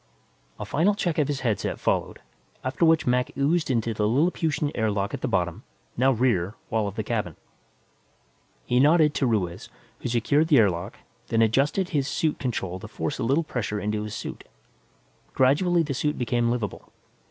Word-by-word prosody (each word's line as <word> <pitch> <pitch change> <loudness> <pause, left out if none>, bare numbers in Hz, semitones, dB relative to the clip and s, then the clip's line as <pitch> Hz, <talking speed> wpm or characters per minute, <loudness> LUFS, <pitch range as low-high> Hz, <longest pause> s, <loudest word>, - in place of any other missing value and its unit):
A - - -4
final 185 +7 +2
check 175 -5 -1
of 145 - +2
his 145 -2 -2
headset 115 -5 -1
followed, - - -1 0.4
after 130 +6 -2
which 160 -1 +4
Mac 125 0 +1
oozed 155 +4 +1
into 115 -3 0
the 105 -1 0
Lilliputian 150 - +1
air 110 -2 0
lock 100 -1 -2
at - - -4
the - - -1
bottom, - - -1 0.3
now 130 +3 +3
rear, 110 -6 +1 0.2
wall 110 -2 +1
of 100 - -6
the 110 - -2
cabin. 105 -7 -2 1.3
He 125 - +2
nodded 150 +2 +5
to 135 - +1
Ruiz, 95 -4 -2 0.3
who 125 - -4
secured 140 +7 +2
the 150 -4 +5
air 105 -5 +5
lock, 90 +6 -6 0.3
then 115 0 +2
adjusted 140 - +1
his 140 -4 0
suit 155 0 -1
control 95 -8 -3
to 105 - -9
force 115 +6 -4
a - - -1
little 140 +8 +2
pressure 110 -8 -3
into 105 +1 -2
his 105 0 -5
suit. - - -6 0.9
Gradually 165 +7 +3
the 145 -3 -3
suit 150 +3 -1
became 120 -1 0
livable. 120 -4 -4
125 Hz, 180 wpm, -25 LUFS, 110-150 Hz, 1.3 s, nodded